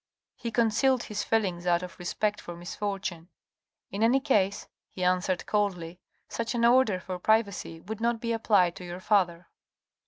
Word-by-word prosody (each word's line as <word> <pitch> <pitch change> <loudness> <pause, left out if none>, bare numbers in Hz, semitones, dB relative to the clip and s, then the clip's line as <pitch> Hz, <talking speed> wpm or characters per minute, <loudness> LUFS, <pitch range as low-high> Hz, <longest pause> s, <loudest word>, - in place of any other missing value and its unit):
He 235 - -5
concealed 235 +3 +2
his 210 -1 -3
feelings 185 -6 0
out 175 0 +2
of 180 0 -9
respect 210 +4 -1
for 175 - -8
misfortune. 185 -1 -5 0.3
" - - -60
In 200 - -4
any 240 +4 +4
case," 205 -8 +1 0.2
he 185 - -6
answered 180 0 +1
coldly, 180 -5 -1 0.2
" - - -42
such 230 +1 -3
an 235 0 +2
order 235 -5 +4
for 185 -1 -6
privacy 200 -5 +1
would 220 +3 -7
not 235 0 +1
be 230 0 -2
applied 200 -6 +3
to 180 - -9
your 175 0 -7
father." 180 -4 +1
200 Hz, 175 wpm, -28 LUFS, 180-225 Hz, 0.3 s, any